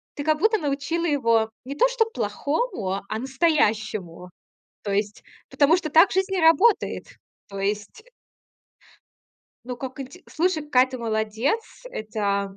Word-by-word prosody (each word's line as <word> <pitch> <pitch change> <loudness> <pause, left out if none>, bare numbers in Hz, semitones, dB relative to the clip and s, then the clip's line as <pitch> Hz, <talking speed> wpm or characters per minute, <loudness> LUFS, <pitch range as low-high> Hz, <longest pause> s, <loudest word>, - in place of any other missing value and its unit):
ты 285 - -4
как 310 0 +2
будто 440 +3 +3
научила 290 +3 -2
его 230 -7 +2 0.2
не 275 - -6
то - - +4
чтоб 450 -2 0
плохому, 220 - -2
а 215 - -2
настоящему. 215 - 0 0.5
То 200 - -3
есть, 205 +1 -2 0.3
потому 295 +3 +4
что 315 -4 -4
так 330 +5 +6
жизнь 380 +1 0
и 365 - +1
работает. 360 +8 +3 0.4
То 195 -1 -8
есть 205 - -3 1.6
Ну, 250 0 -5
как 260 +2 -7
инте 275 +8 -9
слушай, 330 -1 0
какая 265 -3 +3
ты 255 -1 -7
молодец! 220 - -1 0.3
Это 200 -2 -2
265 Hz, 140 wpm, -24 LUFS, 215-330 Hz, 1.6 s, так